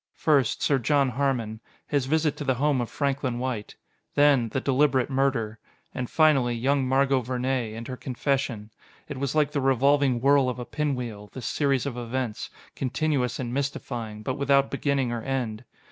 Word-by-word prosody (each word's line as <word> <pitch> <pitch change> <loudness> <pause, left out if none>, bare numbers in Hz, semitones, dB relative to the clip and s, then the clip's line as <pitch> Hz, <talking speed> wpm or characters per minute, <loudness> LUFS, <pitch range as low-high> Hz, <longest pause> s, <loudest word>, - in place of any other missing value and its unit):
First, 140 -6 +2
Sir 140 -2 +3
John 140 +2 +2
Harmon 125 -4 -1 0.3
his 140 -3 0
visit 155 0 +1
to - - -4
the 130 -2 +1
home 140 0 +1
of 120 - -4
Franklin 135 -3 -1
White. 120 -4 -4 0.4
Then 145 -5 +4
the 130 - -1
deliberate 135 -1 +2
murder. 115 -5 0 0.3
And, 125 -2 -4
finally, 140 -7 +3
young 135 +3 +1
Margot 135 0 +3
Vernee, 125 -2 -2
and 115 +1 -7
her 130 - -5
confession. 130 -5 -2 0.4
It 145 -3 -6
was 140 +1 -2
like 150 -1 +2
the 145 - -1
revolving 135 0 +3
whirl 135 0 +4
of 125 - -4
a 125 - -5
pinwheel, 125 -9 -3
this 130 -3 -7
series 140 -3 +1
of 130 -4 -4
events: 120 -1 -3 0.3
continuous 135 -1 -1
and 120 -2 -4
mystifying, 120 -6 -4
but 130 +5 -3
without 140 0 +3
beginning 140 -3 0
or 120 -1 -3
end. 125 -3 -3
130 Hz, 170 wpm, -26 LUFS, 120-140 Hz, 0.4 s, Then